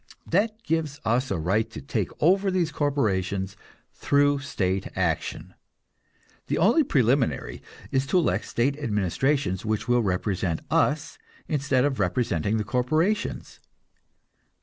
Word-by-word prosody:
That 215 +5 0
gives 155 -5 -1
us 125 +4 +1
a - - -1
right 100 +8 0
to - - -8
take 115 -9 -2
over 190 +5 +3
these 180 -4 0
corporations 100 -10 -1 0.4
through 145 0 +2
state 95 -8 -2
action. - - -2 0.9
The - - 0
only 230 - +4
preliminary 130 - +1 0.3
is 135 0 +1
to 185 - +2
elect 105 - +1
state 135 +5 0
administrations 105 - 0
which 110 -1 -2
will 120 0 +3
represent 90 -4 -1
us, - - +1 0.3
instead 140 -3 +1
of 135 -4 -1
representing 100 0 0
the 105 - -1
corporations. 155 - -1
130 Hz, 125 wpm, -25 LUFS, 105-150 Hz, 0.9 s, only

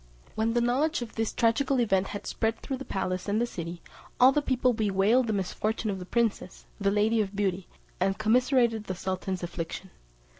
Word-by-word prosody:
When 220 +1 0
the 240 - +3
knowledge 260 +4 +1
of 230 - -10
this 225 -1 -1
tragical 255 +4 +2
event 195 -5 +2
had 205 0 -6
spread 225 0 -1
through 265 - -4
the 270 - -8
palace 185 -1 -3
and 205 +2 +1
the 240 - +2
city, 170 -6 -7 0.4
all 255 +2 +8
the 295 - +1
people 255 -3 +1
bewailed 215 +3 +2
the - - 0
misfortune 210 +3 -1
of 190 - -4
the 180 - -8
princess, 225 -5 -1
the 200 -1 +2
Lady 215 +2 +2
of 200 -1 -4
Beauty, 195 -2 -1 0.3
and 195 +1 +1
commiserated 235 0 +2
the 185 - -4
sultan's 185 0 -3
affliction. 175 +2 -5
215 Hz, 190 wpm, -28 LUFS, 190-240 Hz, 0.4 s, all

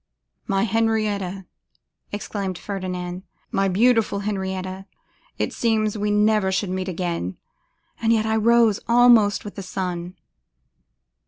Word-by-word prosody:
'My 195 -2 +1
Henrietta!' 210 -4 0 0.7
exclaimed 200 -2 -4
Ferdinand, 180 -2 -5 0.3
'my 195 0 +1
beautiful 215 +1 +2
Henrietta, 190 -1 -4 0.5
it - - -2
seemed 220 -2 +1
we 210 0 -1
never 210 -1 +3
should 190 0 -1
meet 185 0 -3
again, 170 - -3 0.6
and 225 0 +2
yet 220 -1 +2
I 220 0 +1
rose 225 -1 +4
almost 235 -4 +5
with 205 - -7
the 200 - -7
sun. 180 -1 -4
200 Hz, 115 wpm, -23 LUFS, 185-220 Hz, 0.7 s, almost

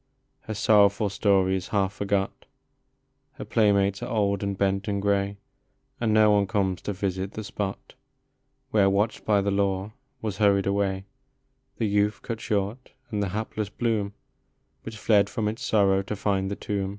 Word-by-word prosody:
Her 110 - -3
sorrowful 105 0 +4
story 95 -1 +2
is 95 - -4
half 100 -2 0
forgot, 100 -1 -2 0.9
Her - - -8
playmates 100 -2 +2
are 120 - -4
old 100 -4 +1
and 100 -1 -2
bent 95 +1 0
and 100 -1 -1
gray, 100 0 0 0.6
And 115 -2 +1
no 110 0 +5
one 100 -1 +3
comes 95 -5 0
to 105 - -3
visit 95 0 -3
the 110 - -5
spot 100 -1 -5 0.8
Where, 100 -3 +4
watched 100 +3 0
by 105 -2 +3
the 100 0 0
law, 100 0 0 0.3
was 105 -5 -4
hurried 100 -2 +4
away 100 -1 0 0.7
The 115 - 0
youth 105 +1 +1
cut 115 -2 -5
short, 105 +3 -2 0.2
and 105 -2 -1
the 100 - -1
hapless 105 +1 -3
bloom 105 -2 -1 0.7
Which 110 0 -8
fled 105 -2 +3
from 110 -4 -2
its 110 +4 -4
sorrow 100 -5 +3
to 100 +2 -5
find 95 -1 0
the 100 - -3
tomb. 100 -2 -3
100 Hz, 165 wpm, -26 LUFS, 100-105 Hz, 0.9 s, no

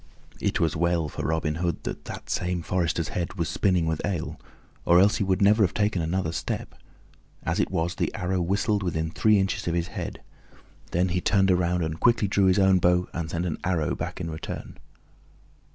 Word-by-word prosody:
It - - 0
was 80 -2 +1
well 85 -1 +1
for - - -6
Robin 80 -1 0
Hood 85 -1 -1
that - - -5
that - - -8
same 90 -1 -1
forester's 85 -3 -1
head 90 +1 -3
was 85 -4 -1
spinning 90 -2 +1
with 80 -1 -2
ale, 95 -6 -3 0.4
or 85 +1 +5
else 100 +2 +4
he - - 0
would 95 0 +1
never 105 +2 +5
have 95 - 0
taken 105 -4 +1
another 80 +1 -1
step. 85 - -4 0.7
As - - -1
it - - +1
was, 85 +1 -1
the - - -1
arrow 90 +1 -1
whistled 100 +3 +1
within 80 -3 -2
three 110 +4 +3
inches 95 -2 -1
of 85 - 0
his 85 0 -1
head. - - -6 0.7
Then 90 +2 +1
he 90 +1 0
turned 95 0 +3
around 90 -1 +1
and 80 0 -3
quickly 115 -3 +3
drew 100 0 +2
his 95 0 +4
own 95 -1 +5
bow, 90 +1 +2
and 85 -2 -3
sent 85 +1 -2
an 85 - -3
arrow 85 -5 0
back - - -5
in 85 -2 -4
return. 80 - -7
90 Hz, 200 wpm, -26 LUFS, 85-95 Hz, 0.7 s, or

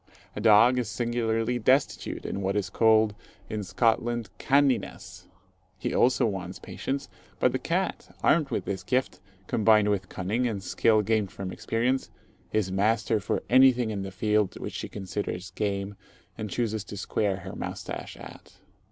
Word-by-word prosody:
A 105 - -4
dog 115 +3 +6
is 120 -4 -2
singularly 120 0 0
destitute 130 +5 +1
in 100 - -3
what 95 +1 -1
is 100 -3 -1
called 110 -1 +4 0.4
in 105 -1 -2
Scotland, 115 +2 0
"canniness." 130 -10 0 0.5
He - - -3
also 125 0 +3
wants 95 -4 -3
patience; 140 +1 -4 0.3
but 125 - +3
the 130 - -1
cat, 180 +3 -2
armed 155 -3 +3
with - - -2
this 95 -1 -3
gift, 130 0 -1 0.3
combined 110 0 +4
with 95 -3 -1
cunning, 110 +7 -1
and 100 -5 -3
skill 110 0 +3
gained 105 -2 0
from 95 -2 -6
experience, 125 +7 -1 0.4
is 105 -4 0
master 110 +3 +1
for 100 - -2
anything 125 -2 +5
in 100 -2 -3
the 95 - -4
field 105 0 0
which - - -5
she - - -5
considers 95 -2 -5
game 100 0 -2 0.4
and 110 - -5
chooses 110 -2 -1
to 100 - -8
square 100 0 0
her - - -8
moustache - - -6
at. - - -12
110 Hz, 155 wpm, -27 LUFS, 100-120 Hz, 0.5 s, dog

